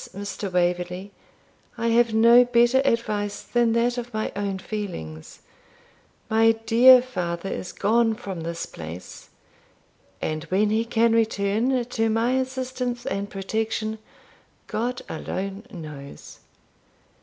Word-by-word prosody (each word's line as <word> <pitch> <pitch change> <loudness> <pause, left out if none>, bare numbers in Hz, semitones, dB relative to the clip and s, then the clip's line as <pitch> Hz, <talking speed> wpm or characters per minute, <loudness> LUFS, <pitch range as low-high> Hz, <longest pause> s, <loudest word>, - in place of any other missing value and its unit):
Mr. 200 -1 -5
Waverley, 180 +2 -1 0.7
I 230 0 0
have 235 0 +3
no 235 +3 +7
better 240 +1 +4
advice 210 -5 -1
than 240 -2 +1
that 240 +1 +1
of 240 0 -7
my 215 -1 -2
own 200 -1 -2
feelings; 180 - -7 0.9
my 225 +1 +4
dear 235 +3 +6
father 180 -7 -4
is 180 - -5
gone 225 +2 +2
from 195 -7 -6
this 170 +1 -4
place, 85 +2 -10 0.9
and 155 0 -3
when 200 +5 +1
he 225 +1 +1
can 230 0 +2
return 225 +3 +1
to 225 -2 0
my 225 +2 +1
assistance 255 -1 -2
and 200 +1 -3
protection, 220 +2 -3 0.7
God 245 +3 -3
alone 195 +6 -5
knows. 150 - -10
220 Hz, 120 wpm, -24 LUFS, 190-235 Hz, 0.9 s, no